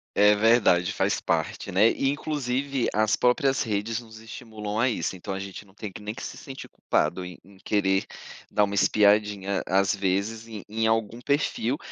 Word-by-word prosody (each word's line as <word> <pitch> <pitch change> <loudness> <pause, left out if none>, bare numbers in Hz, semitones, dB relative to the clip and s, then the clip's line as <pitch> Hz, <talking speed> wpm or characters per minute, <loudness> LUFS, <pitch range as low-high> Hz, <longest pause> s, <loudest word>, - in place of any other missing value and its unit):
É 105 +1 +6
verdade, 105 -5 +4
faz - - 0
parte, - - -2
né, 105 +5 +5
e 135 - 0
inclusive, 140 -2 -1
as 110 0 +2
próprias 130 +2 +2
redes 110 +1 -1
nos 110 -2 -13
estimulam 110 -2 -6
a 125 +2 +3
isso. 105 - -2
Então, 95 +2 -6
a - - -4
gente 100 +1 -7
não 95 - -22
tem 105 -3 -7
que 105 - -10
nem 105 +2 -5
que - - -8
se - - -6
sentir 135 -1 -9
culpado 90 +1 -1
em 90 -1 -8
em 100 +1 -19
querer 95 -1 +1 0.5
dar 105 - +3
uma 100 0 -1
espiadinha 100 -1 +2
às 95 +2 +2
vezes 100 +4 -1
em 105 -4 -8
em 110 +1 0
algum 115 +1 0
perfil, 140 -2 0
105 Hz, 185 wpm, -26 LUFS, 100-115 Hz, 0.5 s, É